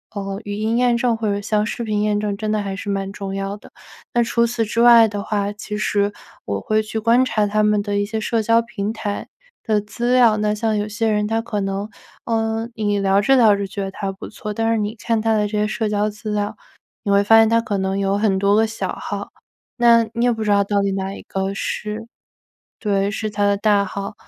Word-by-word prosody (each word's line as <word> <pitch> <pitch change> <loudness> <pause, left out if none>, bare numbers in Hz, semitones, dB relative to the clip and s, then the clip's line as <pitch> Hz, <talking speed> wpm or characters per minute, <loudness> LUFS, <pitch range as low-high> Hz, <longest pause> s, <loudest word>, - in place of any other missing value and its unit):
呃， 195 +1 -4
语 205 0 -5
音 220 +2 -1
验 245 -1 +3
证 235 -1 +1
或 225 -1 -3
者 200 0 0
像 210 +1 0
视 235 - -4
频 210 -2 -1
验 210 0 +1
证 210 -1 -2
真 215 +1 -3
的 215 - +1
还 195 -1 -4
是 200 - -6
蛮 195 0 -2
重 195 -1 -5
要 195 +1 -3
的。 - - -16 0.4
那 240 0 +3
除 235 0 +1
此 230 -1 -1
之 230 +2 -1
外 235 -1 +8
的 205 -1 -4
话， 205 0 -1
其 210 0 -6
实 205 -1 +1 0.3
我 100 0 -2
会 215 - +1
去 215 +1 -5
观 230 +3 +4
察 215 -4 +1
他 215 +1 +1
们 210 -1 +3
的 205 -1 -1
一 205 - 0
些 220 +1 -3
社 225 +1 0
交 230 +2 +3
平 220 -3 -3
台 210 -2 -4 0.4
的 215 -2 +1
资 235 +4 -3
料， 235 -4 +5
那 210 0 0
像 220 0 0
有 210 0 -1
些 225 +2 -1
人 210 -1 +1
他 225 +1 0
可 225 -2 -3
能， 195 +1 -2 0.4
呃， 225 0 -1
你 205 -2 -1
聊 195 0 +3
着 270 +6 +4
聊 220 -5 +6
着 200 -1 -3
觉 200 +1 -5
得 195 - -4
他 195 0 -4
不 190 - -9
错， 215 -1 -6
但 225 +2 0
是 - - +1
你 210 +2 -2
看 225 0 -1
他 225 0 +2
的 210 -1 +1
这 210 0 -2
些 210 - +1
社 220 0 -2
交 210 0 0
资 210 +1 -6
料， 210 +1 -2 0.5
你 200 - -1
会 200 0 +4
发 225 +2 +6
现 225 0 +6
他 230 +1 +3
可 205 -3 -2
能 190 +1 -1
有 195 0 +1
很 205 -3 +1
多 200 +1 +3
个 220 - +4
小 225 0 -4
号， - - -5 0.5
那 235 -1 +5
你 235 +1 +1
也 245 - +4
不 225 -1 -4
知 210 - -2
道 200 0 +4
到 200 0 0
底 200 0 0
哪 195 0 -3
一 - - -9
个 195 0 -3
是 210 +2 -4 0.7
对， 200 -2 0
是 215 0 -3
他 205 0 -2
的 200 - +2
大 205 -1 +3
号。 200 +2 -5
210 Hz, 265 characters per minute, -20 LUFS, 200-225 Hz, 0.7 s, 外